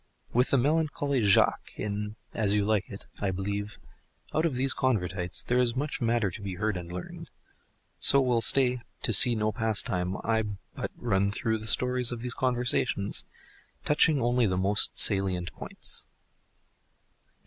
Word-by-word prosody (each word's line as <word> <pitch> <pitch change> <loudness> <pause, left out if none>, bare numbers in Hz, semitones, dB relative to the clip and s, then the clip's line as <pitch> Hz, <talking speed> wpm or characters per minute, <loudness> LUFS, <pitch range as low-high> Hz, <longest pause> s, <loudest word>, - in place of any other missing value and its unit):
With 125 +2 +2
the 140 - +2
melancholy 145 -1 0
Jaques 100 -2 +2
in 105 0 -5 0.2
"As 105 -2 0
You 105 -1 +1
Like 105 -2 0
It," 100 - -9
I 100 - -1
believe: 100 +3 -4 0.6
Out 160 +2 +1
of 145 - -4
these 130 +1 +1
Convertites 95 -8 -1
There 125 +1 0
is 120 -1 +1
much 140 +1 -3
matter 115 -4 0
to 85 - -9
be 95 -2 -5
heard 105 +2 -2
and 85 -1 -7
learned— 90 0 -8 0.7
so 140 - +6
will 125 -3 +1
stay 125 0 +5 0.2
"to 115 - +1
see 120 +5 +7
no 110 0 -1
pastime, 100 -5 -1
I," 110 -1 0 0.3
but - - -5
run 100 -4 0
through 110 +2 -2
the 110 - -9
stories 125 +1 +1
of 120 -1 -6
these 125 -1 -4
conversions, 125 -5 0 0.6
touching 150 0 +3
only 120 -1 +1
the 90 -1 -1
most 100 +3 +2
salient 95 -3 +2
points. - - -7
110 Hz, 160 wpm, -27 LUFS, 100-125 Hz, 0.7 s, see